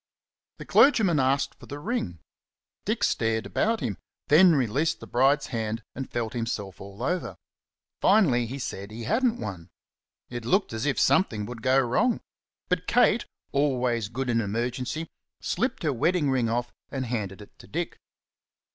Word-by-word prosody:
The - - -9
clergyman 205 - +5
asked 135 +1 +1
for - - -13
the 145 - -6
ring. 145 - -3 0.7
Dick - - -1
stared 110 0 0
at 225 +1 +2
him, 115 -8 -3 0.3
then 165 +2 +7
released 140 +6 +1
the - - -9
bride's 135 +4 +3
hand 110 0 -2
and 135 0 -6
felt 120 0 -3
himself 110 -6 -4
all 100 +4 -8
over; 180 +6 -1 0.7
finally 125 - +4
he 130 +4 -5
said 100 -6 -5
he 115 +2 -7
hadn't 240 - +1
one. 90 -5 -6 0.6
It 120 -1 -6
looked 190 - +1
as 110 +5 -2
if 140 - +1
something 110 - +2
would 115 0 -8
go 130 +3 +4
wrong. 170 - +2 0.5
But - - -1
Kate, 240 -1 +3 0.2
always 125 -6 +1
good 130 +1 -2
in 115 -1 +2
emergency, 120 +8 -2 0.3
slipped 235 +1 -1
her 150 -3 +1
wedding 150 +3 +1
ring 125 -3 +1
off 120 +1 -1 0.2
and 135 -2 -3
handed 105 -5 -3
it 105 - -15
to - - -14
Dick. - - -4
125 Hz, 160 wpm, -27 LUFS, 115-155 Hz, 0.7 s, then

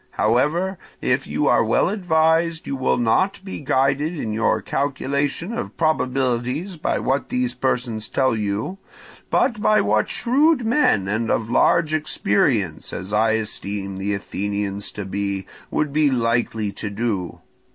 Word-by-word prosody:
However, 165 - +1 0.2
if - - 0
you - - -1
are - - +4
well - - +2
advised, 165 -3 +1
you 140 - -3
will 130 -1 +1
not 125 - +2
be 190 - -6
guided 140 +4 +1
in 110 -6 -3
your 115 +1 +1
calculation 140 - -2
of - - -5
probabilities 135 +2 0
by 155 - -1
what 135 +2 -1
these 250 0 0
persons 120 -4 -1
tell 130 -3 +1
you, 105 - -2 0.5
but 225 -6 +1
by 215 0 +4
what 105 +1 +1
shrewd 270 +2 +2
men 220 - +3
and 110 +3 -1
of 110 +1 0
large 155 +4 +3
experience, 105 - 0
as 95 +3 -5
I 110 +1 +3
esteem 100 -3 -3
the 100 +1 -1
Athenians 100 0 -3
to 105 - -5
be, 100 0 -3 0.2
would 150 -2 -1
be 150 -1 +4
likely 115 -4 0
to 105 - -5
do. 100 -4 -3
125 Hz, 145 wpm, -22 LUFS, 105-160 Hz, 0.5 s, are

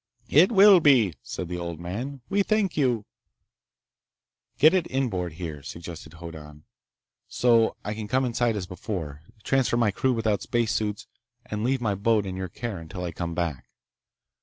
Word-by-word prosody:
"It 170 - +6
will 200 -2 +8
be," 130 - +4
said 90 - -6
the 90 +1 -4
old 85 -2 -5
man. 120 +11 -5
"We 200 0 +1
thank 205 -2 +1
you—" 125 -7 +1 1.5
"Get 155 +5 +6
it 185 -3 +1
inboard, 100 - -1
here," 80 -3 -6
suggested 85 +1 -9
Hoddan, 80 -3 -10 0.6
"so 115 -2 +3
I 105 - -2
can 105 -1 -6
come 130 +3 +1
inside 120 -1 0
as 100 -3 -3
before, 90 -6 -6 0.2
transfer 135 -3 +1
my 115 -3 +3
crew 130 +6 +1
without 110 -4 0
spacesuits, 110 -3 -1 0.4
and 105 0 -4
leave 130 +1 0
my 105 -4 0
boat 105 +1 +1
in 95 -1 -5
your 95 -1 -4
care 110 0 -5
until 85 +3 -7
I 85 - -3
come 85 0 -4
back." 85 -7 -3
105 Hz, 160 wpm, -26 LUFS, 85-125 Hz, 1.5 s, will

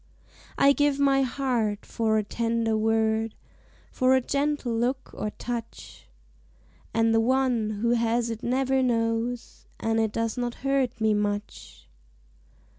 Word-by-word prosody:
I 280 0 +6
give 290 -1 +2
my 275 -1 +4
heart 245 -6 -1
for 220 -1 0
a 215 - +1
tender 230 +1 -1
word, 220 0 +1 0.6
For 255 +1 +3
a - - +4
gentle 280 -1 -1
look 250 +3 -1
or 215 - -3
touch, 235 +1 -7 0.8
And 225 0 +2
the 225 - +4
one 250 -2 +1
who 235 - +3
has 235 0 +1
it 225 0 -6
never 265 +2 +1
knows 230 0 -1
And 225 0 0
it 220 -1 +1
does 230 +1 -2
not 240 -1 -2
hurt 275 -3 +1
me 220 -1 +2
much. 205 0 -4
230 Hz, 135 wpm, -26 LUFS, 225-260 Hz, 0.8 s, I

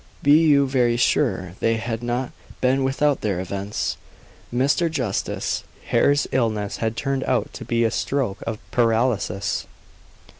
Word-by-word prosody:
Be 145 - +4 0.2
you 140 -2 +5
very 125 -3 +2
sure 95 -6 +1
they 115 0 +2
had 115 0 -3
not 120 +1 -2 0.3
been 130 +1 +2
without 140 +2 +1
their 100 -4 -1
events. 100 +2 -3 0.5
Mr. 140 +7 +2
Justice 125 -11 -2 0.3
Hare's 145 0 +3
illness 110 -5 0
had 110 0 -2
turned 135 -1 -1
out 130 -2 0
to - - -7
be 115 0 +1
a 115 - +2
stroke 130 -7 -1
of 115 - -2
paralysis. 115 -5 +1
120 Hz, 140 wpm, -23 LUFS, 110-135 Hz, 0.5 s, you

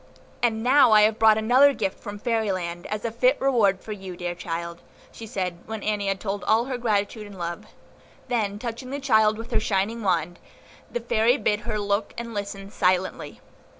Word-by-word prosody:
"And 225 -2 +1
now 255 -2 +6
have 215 +1 +6
I - - -17
brought 220 -1 +5
another 255 +6 +5
gift 195 -3 -2
from 205 0 -7
Fairy 220 -1 0
Land, 175 -2 -4
as 210 +1 -4
a 230 - -1
fit 255 +4 +2
reward 225 -8 +2
for 220 - -9
you, 190 -3 -7
dear 175 0 -3
child," 170 0 -5 0.3
she 225 - -10
said, 180 -4 -3
when 220 -1 -5
Annie 210 -2 -1
had 195 -1 -1
told 200 0 -4
all 225 +2 +3
her 255 -2 -4
gratitude 210 -2 -1
and 200 -1 -12
love; 170 -1 -5 0.6
then, 215 -5 -1
touching 235 +3 -6
the 280 +2 -4
child 220 -6 +3
with 225 +1 -8
her - - +2
shining 215 +1 -1
wand, 175 -3 0 0.5
the 240 - -3
Fairy 230 +2 +2
bid 210 -6 0
her 220 -1 -3
look 205 0 -1
and 235 -1 -6
listen 200 -1 -5
silently. 185 -1 -1
215 Hz, 195 wpm, -25 LUFS, 195-230 Hz, 0.6 s, now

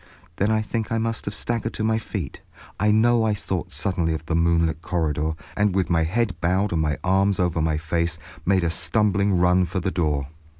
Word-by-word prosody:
Then 100 - +1
I 110 0 +2
think 115 +1 -3
I 115 - +1
must 115 0 -2
have 100 - -4
staggered 115 -1 -2
to 110 - -2
my 110 0 +2
feet. 100 -8 -6 0.4
I 105 - +3
know 115 +2 +4
I 110 -2 +1
thought 95 -3 -4
suddenly 85 -4 0
of 80 - -7
the 85 - -2
moonlit 85 -1 +2
corridor, 80 -3 -1 0.2
and 105 -2 +1
with 95 -2 0
my 80 -1 +3
head 105 +3 0
bowed 95 +4 +1
and 80 - +1
my 75 -1 0
arms 95 +2 +2
over 85 -3 +1
my 80 -1 +1
face, 85 +1 -1 0.3
made 95 0 +2
a 85 - +1
stumbling 100 0 +1
run 90 +1 +4
for 95 - -3
the 95 +1 -2
door. 75 -5 -1
90 Hz, 210 wpm, -23 LUFS, 80-105 Hz, 0.4 s, know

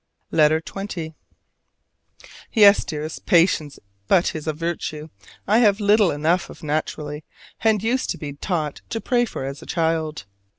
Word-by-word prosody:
LETTER 155 +1 +4
XX. 175 -3 -6 1.4
Yes, 205 -3 +6
Dearest, 155 0 -6
"Patience!" 165 -4 +3 0.3
but 175 - +4
it - - -8
is 155 0 -6
a - - +2
virtue 155 -1 -4 0.4
I 215 +3 +4
have 210 -3 +4
little 205 -1 +4
enough 160 +5 0
of - - -13
naturally, 150 0 -3 0.4
and 220 -2 +3
used 250 +3 0
to - - -2
be 145 -2 -6
taught 155 -1 -3
to 225 - -2
pray 240 +1 +1
for 135 - -6
as 140 +1 -6
a - - -12
child. 160 -4 -1
165 Hz, 155 wpm, -22 LUFS, 150-200 Hz, 1.4 s, Yes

